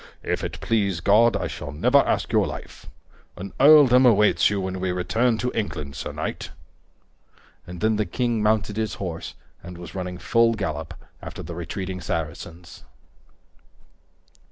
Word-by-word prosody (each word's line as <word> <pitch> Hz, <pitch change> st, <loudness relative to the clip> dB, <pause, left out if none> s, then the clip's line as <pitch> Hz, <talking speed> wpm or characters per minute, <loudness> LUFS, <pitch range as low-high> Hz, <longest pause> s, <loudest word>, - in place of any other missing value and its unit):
"If -, -, -2 dB
it -, -, -5 dB
please 100 Hz, -6 st, 0 dB
God, 110 Hz, +6 st, +4 dB
I -, -, -3 dB
shall 70 Hz, -, -6 dB
never 125 Hz, -, +3 dB
ask -, -, 0 dB
your -, -, +2 dB
life. -, -, -9 dB, 0.5 s
An 95 Hz, +1 st, -8 dB
earldom 135 Hz, -3 st, +7 dB
awaits 105 Hz, -4 st, +4 dB
you 105 Hz, -1 st, -1 dB
when 95 Hz, 0 st, -4 dB
we 95 Hz, 0 st, -1 dB
return 110 Hz, +6 st, 0 dB
to 125 Hz, +2 st, -2 dB
England, 75 Hz, -10 st, -4 dB
sir 70 Hz, -, -5 dB
knight." -, -, -5 dB, 1.2 s
And 90 Hz, 0 st, -9 dB
then 110 Hz, 0 st, +2 dB
the 105 Hz, -2 st, -1 dB
king 120 Hz, +3 st, -1 dB
mounted 105 Hz, -1 st, +1 dB
his 110 Hz, -1 st, -2 dB
horse 85 Hz, -4 st, -6 dB, 0.3 s
and 90 Hz, 0 st, -10 dB
was 85 Hz, -, -10 dB
running 90 Hz, -1 st, -5 dB
full 115 Hz, +4 st, +2 dB
gallop 80 Hz, -6 st, -4 dB, 0.3 s
after -, -, -8 dB
the 85 Hz, -, -7 dB
retreating 90 Hz, +2 st, -5 dB
Saracens. 80 Hz, +1 st, -6 dB
100 Hz, 155 wpm, -24 LUFS, 90-115 Hz, 1.2 s, earldom